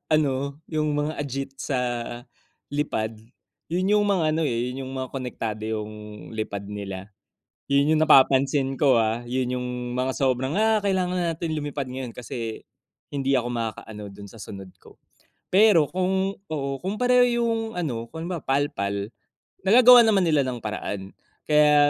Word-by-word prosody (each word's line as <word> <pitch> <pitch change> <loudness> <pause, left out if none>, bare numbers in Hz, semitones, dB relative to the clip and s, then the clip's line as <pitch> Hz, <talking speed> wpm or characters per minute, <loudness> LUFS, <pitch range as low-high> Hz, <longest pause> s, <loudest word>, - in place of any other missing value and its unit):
ano, 145 -3 +2 0.4
yung 155 0 +1
mga 150 +1 0
agit 135 -1 -4 0.2
sa 130 -3 0 1.0
lipad, 115 -7 -1 0.6
yun 185 +4 +1
yung 205 - +2
mga 185 -5 +2
ano 165 - 0
eh, 115 - -1 0.2
yung 130 0 -6
mga 130 0 -3
konektado 115 -4 -4
yung 105 0 -4 0.5
lipad 100 -2 -3 0.2
nila, 95 -2 -5 0.7
yun 140 +2 +4
yung 155 - +2
napapansin 135 -1 +4
ko 135 -5 +5
ah, 110 +1 0
yun 125 0 -1
yung 125 0 -4 0.3
mga 130 +1 0
sobrang, 130 +1 +1
"Ah, 220 0 +4
kailangan 185 -2 0 0.2
natin 165 0 -4
lumipad 145 -2 -4
ngayon 130 -2 -5
kasi 115 -2 -6 0.5
hindi 135 -1 0
ako 120 0 -2
makakaano 110 -2 -5
dun 100 0 -11
sa 115 - -14
sunod 95 -1 -8
ko." - - -18 0.6
Pero 195 -6 +6
kung 190 +1 0 0.2
oo, 140 -3 -2
kung 190 +3 -2
pareho 250 0 +5 0.2
yung 230 -1 +1 0.2
ano, 120 -9 -3
kung 160 +1 -6
halimbawa 175 -4 -4
PAL-PAL, 100 -8 -1 0.6
nagagawan 240 +3 +8
naman 195 -3 +3
nila 155 -3 +4
ng 125 -1 -3
paraan, 100 -2 -4 0.3
kaya 150 -1 +5
135 Hz, 150 wpm, -25 LUFS, 115-170 Hz, 1.0 s, nagagawan